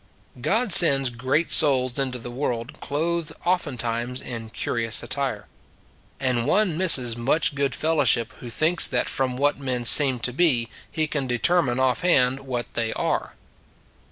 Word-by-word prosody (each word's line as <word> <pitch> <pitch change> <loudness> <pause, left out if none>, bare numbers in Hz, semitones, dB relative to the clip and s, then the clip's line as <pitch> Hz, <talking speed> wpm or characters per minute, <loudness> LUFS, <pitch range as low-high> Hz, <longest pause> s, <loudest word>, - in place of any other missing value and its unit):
God 210 - 0
sends 135 -6 +7
great 130 +7 -2
souls 130 -4 +3
into 130 -2 -3
the 120 0 -10
world 125 +1 -5
clothed 160 +2 -4
oftentimes 125 -8 -3
in 115 -4 -8
curious 115 0 -3
attire. 140 -1 -4 0.7
And 125 -2 -2
one 190 0 +1
misses 135 -10 +3
much 135 +6 -1
good 140 -1 -2
fellowship 140 -7 0
who 120 - -10
thinks 160 +9 +2
that - - -2
from 130 -2 -3
what 145 +1 -1
men 125 -3 -4
seem 135 +1 +7
to 125 - -3
be 130 -7 0 0.2
he 155 - -2
can 145 -3 -5
determine 125 +1 0
offhand 130 0 +1
what 125 -3 -6
they 115 -1 -3
are. - - -4
130 Hz, 145 wpm, -22 LUFS, 120-155 Hz, 0.7 s, sends